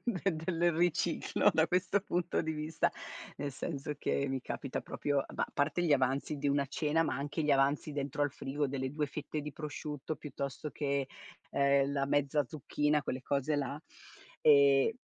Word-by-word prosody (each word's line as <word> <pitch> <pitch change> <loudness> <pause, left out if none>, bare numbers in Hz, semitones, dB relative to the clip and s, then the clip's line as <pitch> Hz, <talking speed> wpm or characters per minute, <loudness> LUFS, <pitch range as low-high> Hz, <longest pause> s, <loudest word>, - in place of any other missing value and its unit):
del 195 -7 0
del 170 +1 +1
riciclo 175 -1 +2
da - - +4
questo 185 +2 +1
punto 180 -2 -1
di 160 -1 -2
vista, 155 +1 0 0.5
nel 145 - -2
senso 145 +1 -4
che 140 - 0
mi 135 0 -1
capita 135 +1 -4
proprio 145 -1 -1
ma - - 0
a - - -2
parte 155 +5 +1
gli 165 - +3
avanzi 135 +2 +1
di 145 +1 -2
una 140 0 +2
cena, 150 +3 +1
ma - - -1
anche 145 +3 -2
gli 150 - +1
avanzi 140 +2 +3
dentro 145 0 -2
al 145 - +2
frigo 140 +1 -2
delle 130 -1 -3
2 150 0 0
fette 150 +1 -4
di 150 0 -6
prosciutto 150 0 -5
piuttosto 140 +1 -5
che, 140 -2 -1 0.4
ehm, 140 0 +3
la 140 -1 0
mezza 145 0 +2
zucchina 150 +1 0
quelle 130 -1 -3
cose 140 +1 0
là, 140 +1 -2 0.6
ehm 140 +5 +6
145 Hz, 175 wpm, -33 LUFS, 140-155 Hz, 0.6 s, ehm